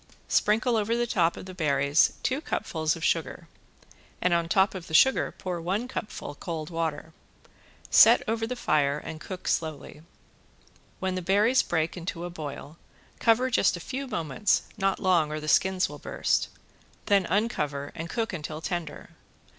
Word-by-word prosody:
Sprinkle 225 +3 +2
over 220 +2 0
the 240 - +1
top 170 -7 +1
of - - -8
the 185 - -9
berries 140 -3 +2
two 265 +3 0
cupfuls 155 - -1
of 165 - -9
sugar - - -1 0.7
and 180 - +2
on 170 -1 +1
top 190 +2 +3
of 185 -3 -7
the 160 - -2
sugar 265 +11 +4
pour 180 -2 -4
one 195 +8 -2
cupful 210 - -6
cold 160 +1 -6
water. 160 -1 -3 0.8
Set - - +7
over 225 0 -1
the 250 - -3
fire 150 - +1
and 155 +1 -8
cook 185 +3 -7
slowly. 155 -2 -3 1.0
When 190 0 -1
the 185 - -3
berries 205 +8 +3
break 160 -1 -1
into 175 -1 -5
a 175 - -6
boil, 155 -1 -8 0.4
cover 245 +3 +3
just 195 -5 +3
a - - -8
few 265 +10 -5
moments, 170 - 0
not 195 -2 0
long, 175 -6 +2
or 155 - -3
the 155 - -7
skins 190 +3 +3
will - - -10
burst, - - 0 0.6
then 200 -4 +3
uncover 150 -9 -1
and 165 +1 -6
cook 225 0 -2
until 155 -2 -5
tender. 165 -3 -5
175 Hz, 165 wpm, -27 LUFS, 155-210 Hz, 1.0 s, Set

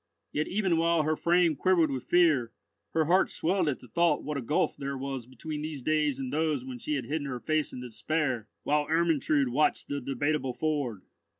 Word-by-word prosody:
Yet 150 - -1
even 190 -4 +1
while 165 -1 +3
her 155 +1 +1
frame 170 -1 +3
quivered 170 -2 +3
with 130 -2 -4
fear, 155 -10 +3 0.4
her 160 -1 +3
heart 180 +4 +3
swelled 175 -1 +1
at 135 - -3
the - - -13
thought 170 +9 +2
what 150 - -3
a 140 - -2
gulf 140 +6 0
there 140 0 -4
was 135 -3 -5
between 150 +3 -6
these 150 -4 -5
days 150 -2 +1
and 130 0 -4
those 150 -4 0
when 130 -2 -7
she 150 - -2
had 130 -4 -3
hidden 145 +2 -2
her 125 -2 -4
face 155 +2 0
in 125 - -7
despair, 125 -1 -2 0.2
while 150 0 +1
Ermentrude 155 -4 +2
watched 145 +5 +1
the 145 0 -2
Debateable 135 +1 -1
Ford. 140 -10 -2
150 Hz, 200 wpm, -29 LUFS, 130-160 Hz, 0.4 s, while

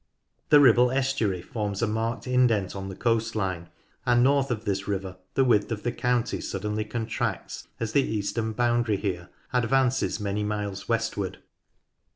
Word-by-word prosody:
The 150 - +8
Ribble 125 -2 +6
estuary 130 -9 0
forms 105 0 -3
a - - +5
marked 110 +2 -2
indent 125 -7 +2
on 95 0 -5
the 95 - -7
coast 115 +1 0
line, 95 -5 -2 0.3
and 120 0 +4
north 140 +1 +3
of 115 -2 -3
this 100 -2 -1
river 95 -2 -3 0.2
the 135 - +4
width 115 -4 +2
of 110 -2 -3
the 120 - 0
county 125 -1 0
suddenly 105 +2 -2
contracts, 110 +1 -3
as 115 -2 -2
the 140 - +4
eastern 110 -1 -2
boundary 120 -2 +1
here 95 -3 -3 0.2
advances 125 +1 +2
many 105 0 -2
miles 105 -1 -3
westward. 115 -4 -1
110 Hz, 160 wpm, -26 LUFS, 100-120 Hz, 0.3 s, The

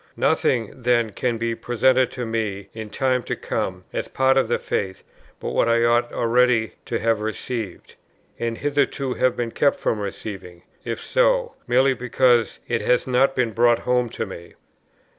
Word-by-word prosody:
Nothing, 115 -4 +1
then, 120 -2 +2
can 120 +3 -1
be 115 0 -1
presented 125 +2 +2
to 125 -1 -4
me, 110 -3 -3
in 110 -1 -7
time 130 +2 0
to - - -3
come, 90 -1 -3
as - - -2
part 130 0 +2
of 135 -3 +3
the 120 - +1
faith, 95 -2 -3 0.4
but - - -4
what 115 - +2
I 115 0 +3
ought 120 0 +2
already 120 -1 +2
to 115 - -2
have 115 -1 +1
received, 110 -2 -5 0.5
and 115 -1 -2
hitherto 140 -2 0
have 130 -1 +1
been 120 -1 -2
kept 140 +3 +2
from 110 - -1
receiving, 95 -3 -7 0.2
(if - - -4
so,) - - +1
merely 130 +2 +4
because 125 -2 +2
it - - 0
has 125 - +2
not 130 +1 +2
been 125 -3 +1
brought 120 +1 +4
home 125 -1 +2
to - - -4
me. 85 -4 -10
120 Hz, 170 wpm, -23 LUFS, 110-130 Hz, 0.5 s, merely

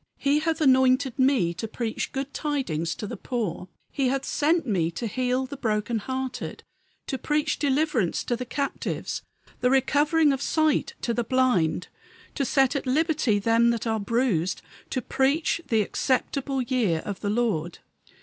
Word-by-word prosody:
He 285 +2 +2
hath 320 +1 -1
anointed 260 -1 +4
me 260 -10 +3
to 225 - -5
preach 225 0 -3
good 275 0 -4
tidings 180 - -2
to - - -5
the 225 - -5
poor; 210 -6 -3 0.2
He 275 -3 0
hath 270 +1 -1
sent 320 +2 +1
me 180 -9 +1
to 170 +8 -5
heal 255 +3 0
the 280 +2 -8
broken 220 -2 -1
hearted; 260 +3 -4 0.4
To 265 - -3
preach 300 +3 0
deliverance 280 - +1
to 240 - -1
the 250 - -4
captives; 275 +3 -3 0.4
The 250 - +2
recovering 290 +3 +3
of 270 - -3
sight 310 0 +1
to 235 - -1
the 240 - 0
blind; 230 -10 +1 0.5
To 280 - -1
set 270 +1 +2
at 275 - -2
liberty 295 -5 +2
them 230 +3 +3
that 235 -1 -1
are 220 -1 0
bruised; 200 -5 0 0.3
To 255 - -2
preach 285 +8 +1
the 220 -2 +3
acceptable 265 +3 -1
year 230 -11 0
of 205 -2 -4
the 205 - -2
Lord." 205 -7 0
255 Hz, 160 wpm, -26 LUFS, 220-275 Hz, 0.5 s, anointed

